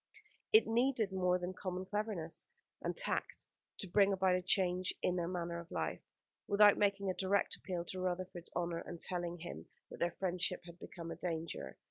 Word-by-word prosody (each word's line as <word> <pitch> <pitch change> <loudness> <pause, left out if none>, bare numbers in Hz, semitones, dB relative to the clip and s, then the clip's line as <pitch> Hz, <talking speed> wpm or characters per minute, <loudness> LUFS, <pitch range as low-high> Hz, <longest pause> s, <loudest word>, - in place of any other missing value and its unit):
It 435 - +7
needed 235 -2 +2
more 180 -1 +2
than 180 +1 -4
common 185 0 -4
cleverness 200 -5 -3 0.3
and - - -2
tact - - +1 0.3
to 195 - -2
bring 200 +2 +4
about 190 -1 +3
a 180 - +2
change 185 0 +2
in 180 - +2
their 170 -2 -1
manner 170 -1 -3
of 170 0 -10
life, - - -2 0.5
without 205 0 +7
making 200 -1 +1
a - - -3
direct 195 +2 +1
appeal 175 -2 -4
to 185 - -4
Rutherford's 180 -1 -3
honour 170 -1 -1
and 170 - -7
telling 175 -1 0
him 170 - -8 0.2
that - - -8
their 170 0 0
friendship 180 -1 0
had 170 0 -12
become 170 -2 -7
a - - -4
danger. 165 - -4
180 Hz, 180 wpm, -36 LUFS, 175-195 Hz, 0.5 s, It